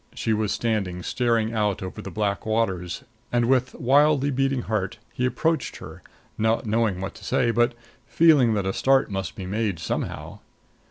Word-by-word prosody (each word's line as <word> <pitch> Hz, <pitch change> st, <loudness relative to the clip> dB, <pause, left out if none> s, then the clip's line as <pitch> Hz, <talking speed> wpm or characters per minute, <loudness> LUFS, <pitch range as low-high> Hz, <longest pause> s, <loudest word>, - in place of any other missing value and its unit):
She 110 Hz, -, 0 dB
was 105 Hz, -1 st, 0 dB
standing 100 Hz, -6 st, -1 dB
staring 115 Hz, -1 st, 0 dB
out 105 Hz, -4 st, 0 dB
over 90 Hz, -5 st, -6 dB
the -, -, -7 dB
black 100 Hz, -2 st, -1 dB
waters; 95 Hz, -6 st, -1 dB, 0.3 s
and, 120 Hz, -1 st, +2 dB
with 130 Hz, +1 st, +1 dB
wildly 140 Hz, +2 st, +3 dB
beating 135 Hz, -1 st, 0 dB
heart, 105 Hz, -3 st, -2 dB, 0.2 s
he 125 Hz, +1 st, 0 dB
approached 160 Hz, +6 st, -1 dB
her, -, -, -10 dB, 0.4 s
not 110 Hz, +2 st, +1 dB
knowing 110 Hz, -4 st, 0 dB
what 95 Hz, -, -4 dB
to -, -, -14 dB
say, 125 Hz, -2 st, +1 dB
but 120 Hz, +1 st, +2 dB, 0.3 s
feeling 145 Hz, -9 st, +5 dB
that 100 Hz, -2 st, -1 dB
a 95 Hz, -, 0 dB
start 135 Hz, -4 st, +2 dB
must 95 Hz, -1 st, -3 dB
be 95 Hz, -, -6 dB
made 100 Hz, -1 st, -1 dB
somehow. 80 Hz, -, -4 dB
115 Hz, 170 wpm, -24 LUFS, 100-125 Hz, 0.4 s, feeling